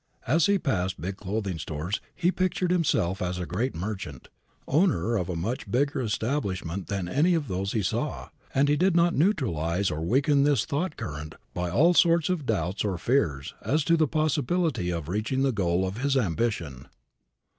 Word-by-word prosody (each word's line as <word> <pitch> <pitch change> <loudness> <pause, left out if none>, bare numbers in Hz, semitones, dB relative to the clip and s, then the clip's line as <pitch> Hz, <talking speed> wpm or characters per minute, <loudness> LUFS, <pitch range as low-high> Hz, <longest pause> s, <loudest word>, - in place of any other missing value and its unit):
As 155 +6 +3
he 200 0 +4
passed 95 - -1
big 95 +2 -4
clothing 100 -3 -3
stores 80 +7 -3
he 180 0 +2
pictured 185 -1 0
himself 135 - +1
as 90 0 -2
a 90 - -3
great 115 +10 -2
merchant, 90 - -5 0.4
owner 135 - +2
of 90 -4 -1
a 90 - -2
much 105 +10 -3
bigger 140 +2 +1
establishment 100 - -2
than 95 -3 -2
any 160 - +3
of 155 -4 -1
those 95 +1 -2
he 110 - 0
saw, - - -2 0.2
and 140 +2 +3
he 145 - +3
did 180 +3 +2
not 170 0 +4
neutralize 100 - +1
or 75 +1 -3
weaken 140 - +3
this 145 -6 +2
thought 160 +3 -2
current 75 0 -6 0.2
by 90 0 -2
all 160 - +4
sorts 170 -1 +4
of 165 -7 -1
doubts 95 -2 -1
or 100 -4 -1
fears 85 - 0
as 150 +2 +1
to 170 +3 +3
the 160 -2 +3
possibility 155 - 0
of 85 -4 -3
reaching 110 +8 -1
the 135 - +3
goal 95 -4 +1
of 95 +4 -4
his 135 +1 +1
ambition. 85 - -1
110 Hz, 180 wpm, -27 LUFS, 90-150 Hz, 0.4 s, he